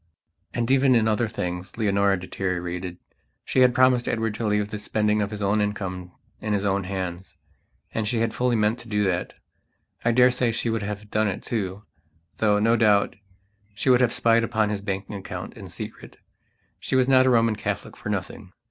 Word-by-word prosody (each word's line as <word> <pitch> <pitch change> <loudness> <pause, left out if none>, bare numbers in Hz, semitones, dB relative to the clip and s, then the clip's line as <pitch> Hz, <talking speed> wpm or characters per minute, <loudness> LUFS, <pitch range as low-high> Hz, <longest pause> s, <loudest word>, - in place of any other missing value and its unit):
And 120 +1 0
even 135 -1 +5
in 110 -1 +3
other 110 +2 +1
things 90 -2 -5
Leonora 100 -3 +2
deteriorated. 90 -1 -4 0.5
She - - 0
had 125 -1 +5
promised 125 -1 +4
Edward 115 -2 -1
to 110 +1 -3
leave 105 0 +1
the 105 - -4
spending 105 0 0
of 100 - -1
his 105 -1 -5
own 100 +2 +2
income 95 -3 -3 0.3
in 105 -1 -2
his 100 0 0
own 100 -1 0
hands. 95 -1 -5 0.6
And 110 -1 -1
she 115 - 0
had 115 -1 0
fully 125 +1 +1
meant 110 +2 +1
to 115 - -11
do 105 -2 0
that. 90 -2 -1 0.7
I 115 - +3
daresay 125 -1 +3
she 115 0 -1
would 115 -1 -1
have 105 0 -6
done 110 0 +2
it 95 - -3
too; 100 -3 -3 0.5
though, 105 -2 +3
no 115 +3 +3
doubt, 105 -3 +3 0.6
she 115 +6 +2
would 125 0 +5
have 120 -2 +3
spied 115 0 +3
upon 110 -2 +1
his 105 -1 -2
banking 100 0 -4
account 95 - -7
in - - -9
secret. - - -9 0.6
She - - -2
was 130 -1 +4
not 130 -1 +5
a - - +5
Roman 115 -2 +3
Catholic - - -4
for - - -7
nothing. 90 - -5
105 Hz, 190 wpm, -24 LUFS, 100-115 Hz, 0.7 s, even